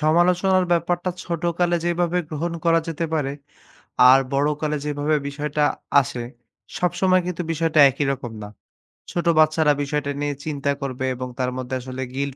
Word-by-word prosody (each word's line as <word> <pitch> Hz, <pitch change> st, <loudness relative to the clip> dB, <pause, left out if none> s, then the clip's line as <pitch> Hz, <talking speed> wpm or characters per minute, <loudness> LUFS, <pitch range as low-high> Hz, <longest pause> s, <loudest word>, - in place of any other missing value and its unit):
সমালোচনার 180 Hz, +4 st, +3 dB
ব্যাপারটা 175 Hz, +2 st, 0 dB
ছোটকালে 175 Hz, 0 st, 0 dB
যেইভাবে 175 Hz, 0 st, 0 dB
গ্রহণ 165 Hz, +2 st, -3 dB
করা 165 Hz, 0 st, +4 dB
যেতে 165 Hz, 0 st, -2 dB
পারে 140 Hz, -3 st, -1 dB, 0.8 s
আর 135 Hz, -, +8 dB
বড়কালে 150 Hz, +2 st, 0 dB
যেভাবে 150 Hz, +1 st, 0 dB
বিষয়টা 150 Hz, +1 st, -2 dB, 0.4 s
আসে, 120 Hz, -2 st, -5 dB, 0.5 s
সব 180 Hz, -, +1 dB
সময় 185 Hz, -1 st, +4 dB
কিন্তু 180 Hz, -1 st, -3 dB
বিষয়টা 165 Hz, -1 st, +1 dB
একই 140 Hz, +2 st, -2 dB
রকম 130 Hz, -3 st, -5 dB
না। 105 Hz, -, -8 dB, 0.6 s
ছোট 175 Hz, -, -2 dB
বাচ্চারা 155 Hz, -1 st, +4 dB
বিষয়টা 145 Hz, 0 st, -2 dB
নিয়ে 145 Hz, -1 st, -1 dB
চিন্তা 140 Hz, -2 st, -1 dB
করবে 130 Hz, -1 st, -3 dB
এবং 125 Hz, +1 st, -5 dB
তার 125 Hz, 0 st, 0 dB
মধ্যে 130 Hz, 0 st, -4 dB
আসলে 130 Hz, +1 st, -6 dB
guilt 140 Hz, -1 st, -2 dB
150 Hz, 150 wpm, -22 LUFS, 140-170 Hz, 0.8 s, আর